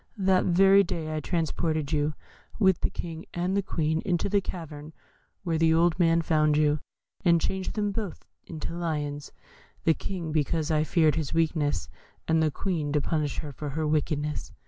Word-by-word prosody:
That 190 -2 +3
very 195 +2 +6
day 155 -3 -3
I - - -1
transported 160 -2 -1
you, 150 -1 0 0.4
with 190 -5 +4
the - - +1
King 165 -1 -7
and 180 +2 0
the 200 - +2
Queen, 160 -4 -1
into 175 +1 0
the 200 0 +2
cavern 155 -4 -7 0.5
where 165 -3 0
the 160 0 +4
old 170 +1 +3
man 165 -1 +3
found 155 -2 +3
you, 150 0 +3 0.4
and 170 -3 +5
changed 190 +3 -2
them 205 -1 0
both 200 -3 -5 0.2
into 160 0 -5
Lions. 150 -4 -3 0.5
The 160 - +4
King 170 -2 -5
because 155 +1 0
I 155 -1 +3
feared 155 0 +3
his 155 -1 -3
weakness, 150 - +1 0.4
and 160 0 +3
the 155 - +3
Queen 155 -1 -2
to 150 - +3
punish 150 -2 -1
her 150 - -7
for 145 +2 -6
her 155 +3 -2
wickedness. 150 0 -1
160 Hz, 175 wpm, -27 LUFS, 150-175 Hz, 0.5 s, very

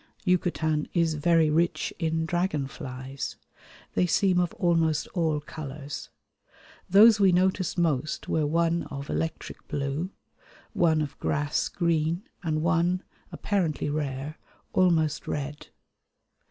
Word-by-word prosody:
Yucatan 165 -4 +1
is 165 -2 +3
very 160 0 +3
rich 170 +3 +1
in 160 -1 0
dragonflies. 140 -6 -3 0.6
They 180 - +2
seem 185 0 +3
of 175 -2 +1
almost 165 -4 +2
all 160 -4 0
colours. 145 -1 -7 0.8
Those 210 +3 +7
we 195 -2 +5
noticed 185 0 +1
most 155 -4 0
were 155 -2 +1
one 170 +2 +1
of 140 +1 -6
electric 160 -1 -4
blue, 140 +5 -2 0.6
one 160 -3 +3
of 145 - -7
grass 145 0 0
green, 170 +1 0 0.2
and 155 -3 -1
one, 170 +3 +2 0.3
apparently 165 -8 -1
rare, 145 0 -3 0.3
almost 160 -5 +2
red. 145 +1 -4
160 Hz, 115 wpm, -27 LUFS, 150-175 Hz, 0.8 s, Those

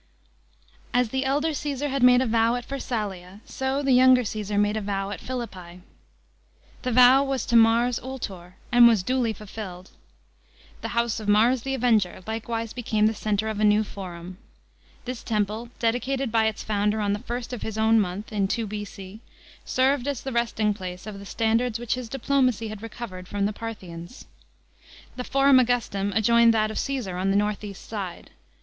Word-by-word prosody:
As 245 -2 +3
the 265 +3 -1
elder 295 +4 +1
Caesar 290 -1 -3
had 275 0 -2
made 250 0 +6
a - - +1
vow 230 0 +2
at 245 0 -5
Pharsnlia,. 205 -8 -4 0.2
o 265 +2 0
the 275 - +1
younger 255 0 +6
Caesar 210 -1 -3
made 205 +1 +2
a 220 - -1
vow 195 -1 -3
at 195 - -6
Philippi. 185 -9 -7 1.0
The 250 - -2
vow 250 +3 +7
was 270 -2 -2
to 235 - 0
Mars 230 +2 +4
Ultor, 195 -9 -7 0.2
and 240 0 +8
was 220 -6 +3
dul\ 250 0 0
fulfilled. 190 -3 -9 0.9
The - - -3
house 235 -1 +1
of 215 - -7
Mars 225 +5 +4
the 270 +2 -2
Avenger 220 -8 +1
likewise 225 0 -4
became 220 -3 0
the 220 - +3
centre 215 0 -1
of 215 -1 -3
a - - +1
new 210 0 +4
Forum. 185 -2 -9 0.7
This 250 -1 -5
temple, 215 +1 -2
dedicated 250 +2 -1
by 220 -1 +3
its 220 - -3
foundei 210 0 0
on 205 -1 0
the 205 - -2
first 240 +1 -5
of 245 - -5
his 220 -1 -5
own 220 +1 +4
month 200 +2 -3
in 200 -2 +1
2 230 +3 -1
B.C., 205 -1 -7 0.5
served 265 +1 +1
as 280 -4 -3
the 270 - -4
resting 230 -3 0
place 185 -2 -7
of 210 -2 -7
the 200 - -10
standards 230 +2 0
which 240 -1 -2
his 250 -2 -5
diplomacy 255 -3 0
had 215 -1 -8
recovered 210 -5 -8
from 200 0 -1
the 210 - -1
Parthians. 195 - -8 0.9
The 250 - -4
Forum 275 0 +4
Augnstum 230 -5 0
adjoined 230 +1 +5
t1 - - +3
at 215 0 +1
of - - -5
C'sesar 210 -10 -3
on 190 - +1
the 195 - +3
north 210 0 -1
east 200 -2 -9
side. 195 -6 -6
225 Hz, 185 wpm, -25 LUFS, 205-250 Hz, 1.0 s, and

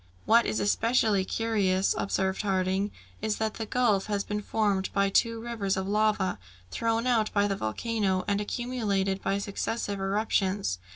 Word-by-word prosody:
"What 230 +1 +5
is - - -1
especially 220 -1 +2
curious," 195 -3 +1
observed 190 -1 -1
Harding, 190 0 0 0.3
"is 215 0 0
that 220 -1 -1
the 225 - -5
gulf 220 -6 +2
has 205 -1 -1
been 210 0 -3
formed 200 -3 0
by 200 0 +2
two 230 +3 +2
rivers 225 -5 -2
of 190 0 -2
lava, 210 - +1 0.3
thrown 230 +1 0
out 230 -4 +2
by 205 0 +3
the 200 - -1
volcano, 190 - -1
and 200 0 +1
accumulated 205 -5 -1
by 195 - 0
successive 200 +1 -3
eruptions. 195 - 0
205 Hz, 155 wpm, -28 LUFS, 195-225 Hz, 0.3 s, What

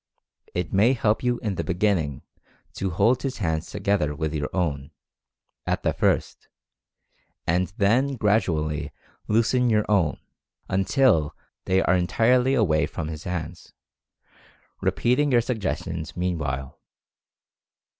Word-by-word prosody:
It 90 -1 -2
may 105 +7 +4
help 110 -4 +1
you 125 -1 +1
in 105 -3 -1
the - - -1
beginning 90 - 0 0.5
to 95 - -2
hold 110 +9 +2
his 135 -2 -3
hands 80 -5 -2
together 95 -7 0
with 80 +1 -3
your 75 -1 -2
own, 75 -7 -2 0.8
at - - -1
the - - +1
first, - - 0 1.0
and 90 +2 +1
then 125 +7 +2
gradually 85 - 0 0.4
loosen 120 +3 +2
your 105 -2 +2
own, 95 -7 +2 0.5
until 95 - +2 0.3
they 95 0 +2
are - - +3
entirely 125 +9 +3
away 80 -10 +2
from 80 -2 -5
his 75 -2 -7
hands, 90 -2 -5 1.1
repeating 140 +4 +1
your 120 - +5
suggestions 95 -9 -4
meanwhile. 70 -7 -3
95 Hz, 120 wpm, -24 LUFS, 80-115 Hz, 1.1 s, your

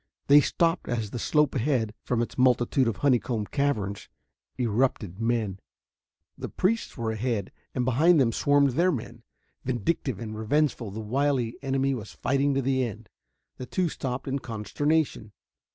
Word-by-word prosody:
They 145 +1 +7
stopped 165 +3 0
as 115 -4 -2
the 120 - -4
slope 150 +1 +2
ahead, 120 -4 0
from 120 -1 +1
its - - -7
multitude 125 0 +3
of 115 - -1
honeycomb 120 -5 +2
caverns, 105 -8 -2 0.5
erupted 115 -5 0
men. 115 -4 -1 0.8
The - - -6
priests 225 +5 -1
were 115 -2 -1
ahead, 110 -3 -2 0.2
and 125 -2 0
behind 155 +7 +4
them 120 -4 +3
swarmed 145 +3 +3
their 175 +8 +2
men. 120 -3 -6 0.4
Vindictive 130 - -1
and 110 -2 -6
revengeful, 120 +1 0
the 105 +3 -6
wily 125 +1 0
enemy 135 0 0
was 110 -5 -6
fighting 140 +1 +1
to 135 - +1
the 130 0 +1
end. 110 -3 -6 0.5
The 125 - -7
two 180 +3 0
stopped 130 -2 -4
in 135 +1 -1
consternation. 120 +1 -1
125 Hz, 150 wpm, -27 LUFS, 110-140 Hz, 0.8 s, They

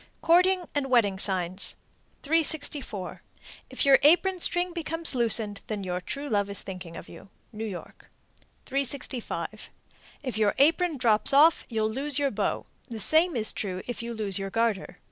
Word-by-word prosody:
_ - - -39
COURTING 365 +2 +3
AND 285 -2 -2
WEDDING 205 -6 +2
SIGNS. 185 -1 0 0.5
364. 290 - -1 0.5
If - - -2
your 275 -1 +6
apron 355 +5 +4
string 350 +1 -1
becomes 330 -1 -3
loosened, 225 -4 +4
your 185 -4 -3
true 280 +10 -6
love 205 -5 0
is 200 - -5
thinking 180 -3 -8
of - - -10
you. - - -14 0.2
New 220 +1 -5
York. 185 -4 -10 0.6
365. 270 -2 -3 0.5
If 255 -5 -4
your 210 -2 +2
apron 325 +3 +2
drops 230 +1 +4
off, 310 +4 +5
you'll 220 -2 -1
lose 275 +4 -1
your 285 -2 +1
beau. 205 -1 -2 0.2
The 230 -2 -6
same 320 - +4
is 220 -2 -1
true 185 -3 -4
if 245 -1 -6
you 235 0 -6
lose 205 -3 -3
your 195 0 -4
garter. 225 -2 -1
235 Hz, 160 wpm, -26 LUFS, 205-295 Hz, 0.6 s, your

